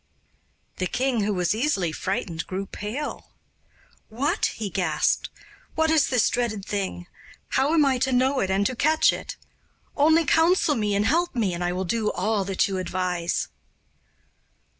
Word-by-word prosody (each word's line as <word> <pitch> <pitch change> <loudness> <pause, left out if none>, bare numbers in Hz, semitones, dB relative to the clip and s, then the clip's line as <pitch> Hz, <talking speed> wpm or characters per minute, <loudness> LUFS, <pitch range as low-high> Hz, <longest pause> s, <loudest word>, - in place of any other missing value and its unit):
The 185 - -1
king, 250 +2 0
who 210 - 0
was 180 -1 +1
easily 215 - 0
frightened, 170 -1 -3
grew 190 +1 -4
pale. 215 +10 -6 0.8
'What?' 255 +7 0
he 220 - -5
gasped 180 -5 0 0.5
'what 320 0 +2
is 315 -3 +4
this 250 -4 +3
dreadful 230 -5 -1
thing? 195 -3 -3 0.4
How 280 +5 +2
am 305 -3 +5
I 265 -2 +2
to 265 +1 +1
know 260 +2 +2
it 190 - 0
and 195 +1 +1
to 255 - 0
catch 310 +6 +3
it? - - -7 0.6
Only 320 +3 +4
counsel 330 0 +3
me 210 -5 0
and 205 +1 +1
help 340 +3 +1
me, 210 -7 0
and 175 +1 -3
I 175 - 0
will 185 +1 -2
do 215 +3 0
all 215 -2 0
that 195 -1 +1
you 190 -2 -3
advise. 180 -1 -2
215 Hz, 160 wpm, -25 LUFS, 190-275 Hz, 0.8 s, am